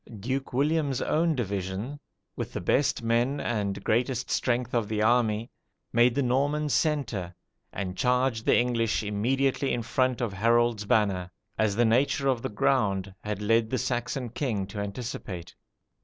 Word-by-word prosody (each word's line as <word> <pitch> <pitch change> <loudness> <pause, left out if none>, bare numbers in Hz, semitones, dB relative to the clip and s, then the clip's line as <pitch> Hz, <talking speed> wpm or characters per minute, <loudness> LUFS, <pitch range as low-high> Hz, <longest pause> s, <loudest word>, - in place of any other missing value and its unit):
Duke 130 +6 -3
William's 140 0 +1
own 160 +2 +1
division, 100 +4 -3 0.4
with - - -5
"the - - -2
best 135 -3 +1
men 120 +5 +1
and 100 -4 -2
greatest 125 +2 0
strength 125 0 0
of 115 -3 +1
the 110 -1 -2
army," 115 -1 +2 0.4
made 120 +1 +4
the 140 - +2
Norman 145 +4 +1
centre, 130 - 0 0.4
and 95 -2 -4
charged 125 0 +1
the - - +5
English 115 -3 +1
immediately 130 +7 0
in 120 - -1
front 130 +1 +1
of 120 -5 -2
Harold's 115 +1 +2
banner, 100 -5 +1 0.3
as 110 -2 +1
the 120 +2 +3
nature 135 +4 +2
of 130 -3 +1
the - - -3
ground 100 -4 +1
had 105 -1 -3
led 115 +1 +2
the 130 - 0
Saxon 125 +1 -2
king 110 -5 -2
to 100 +2 -7
anticipate. 100 -4 -5
120 Hz, 155 wpm, -27 LUFS, 105-130 Hz, 0.4 s, the